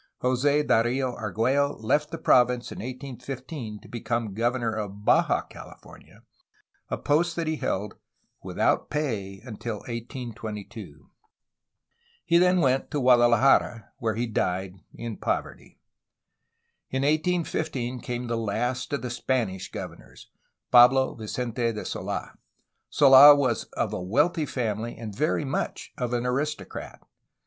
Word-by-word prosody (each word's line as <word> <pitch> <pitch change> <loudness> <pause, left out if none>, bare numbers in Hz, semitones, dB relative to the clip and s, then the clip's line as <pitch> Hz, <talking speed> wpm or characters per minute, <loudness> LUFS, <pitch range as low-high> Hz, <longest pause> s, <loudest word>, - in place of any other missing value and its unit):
Jos6 140 +4 +2
Darfo 125 +3 +1
Argiiello 120 +7 0
left 150 +7 +1
the - - -5
province 125 0 +3
in - - -7
1815 130 -1 -7
to - - -15
become 115 -2 -3
governor 120 +1 0
of 105 -1 -6
Baja - - +3
California, - - -14 0.7
a - - -2
post 165 +3 +1
that 170 - -2
he 155 0 -1
held, 100 -5 -2 0.5
without - - 0
pay, 105 -10 -3
until 110 -2 -6
1822. 115 -2 -7 1.2
He 170 - +4
then 180 0 +4
went 135 -2 +1
to 145 - -2
Guadalajara, 120 -2 +4
where 110 -2 -1
he 120 +2 -1
died 95 -4 -2 0.2
in 115 -2 -6
poverty. - - -4 1.1
In 130 +1 -1
1815 155 -5 -1
came 120 +1 -4
the 120 -1 -2
last 120 +4 -2
of 140 - -2
the 125 - -3
Spanish 115 -7 -2
governors, - - -10 0.4
Pablo 130 +2 +6
Vicente 120 +1 -2
de 105 - -6
Sold. - - -4 0.6
Sola 140 +1 +9
was 130 -5 0
of - - -2
a - - -3
wealthy 145 - +1
family 115 -2 -3
and 110 -3 -7
very 150 +2 0
much 135 - -3
of 125 -2 -3
an 120 0 -1
aristocrat. 145 +5 -4
125 Hz, 125 wpm, -26 LUFS, 115-135 Hz, 1.2 s, Sola